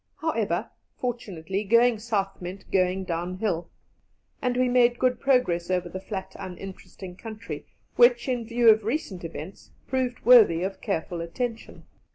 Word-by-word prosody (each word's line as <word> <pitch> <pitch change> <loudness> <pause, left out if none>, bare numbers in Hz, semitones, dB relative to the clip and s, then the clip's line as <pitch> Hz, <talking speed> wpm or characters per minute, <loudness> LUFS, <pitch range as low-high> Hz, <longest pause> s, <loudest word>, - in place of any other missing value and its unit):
However, - - -1 0.3
fortunately, 200 -6 -3
going 230 +2 +4
south 205 -4 -2
meant 185 +2 -8
going 185 0 +2
downhill, 175 +1 -2 0.7
and 250 -1 0
we 255 0 +3
made 245 -1 +4
good 250 -1 +1
progress 250 -11 +2
over 180 -1 0
the 185 - -6
flat 190 -1 -6
uninteresting 190 -1 -9
country, 215 -8 -8 0.3
which, 240 0 +5
in 245 -3 -1
view 235 0 +4
of 220 0 +2
recent 220 - -3
events, 165 +2 -8 0.2
proved 255 -2 -2
worthy 220 -9 +7
of 190 0 -4
careful 175 -3 -2
attention. 230 +7 -5
200 Hz, 140 wpm, -26 LUFS, 180-240 Hz, 0.7 s, worthy